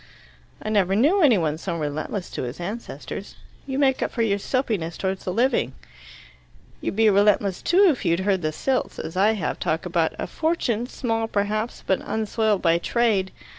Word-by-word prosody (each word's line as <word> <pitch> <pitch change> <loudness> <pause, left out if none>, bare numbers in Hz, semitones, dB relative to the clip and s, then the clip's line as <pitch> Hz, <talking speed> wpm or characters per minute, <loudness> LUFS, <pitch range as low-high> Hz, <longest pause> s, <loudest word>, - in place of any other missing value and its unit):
"I - - -3
never 195 -3 +2
knew 305 - +4
any 265 - +6
one 155 -3 -1
so 170 -1 -3
relentless 155 +5 -4
to - - -4
his 125 +4 -5
ancestors. 205 +7 -6 0.3
You 265 -1 -2
make 270 -2 +2
up - - 0
for 230 - -1
your 200 -2 +1
soapiness 200 -9 -1
towards 190 0 -3
the 185 - -1
living." 240 +7 +1 1.1
"You'd - - -3
be 220 +1 +4
relentless 200 -1 +3
if 355 - +4
you'd 170 +2 +1
heard 190 -1 +1
the 155 -1 -1
Silts, 260 - -1
as 160 - -6
I 205 +4 +4
have, 195 -8 -3
talk 160 +1 -1
about 170 -2 0
'a - - -3
fortune, 250 -8 -1
small 225 -3 -2
perhaps, 215 +2 -2
but 190 - +1
unsoiled 220 -2 0
by 170 -1 +4
trade! 210 -2 +1
205 Hz, 175 wpm, -24 LUFS, 180-235 Hz, 1.1 s, any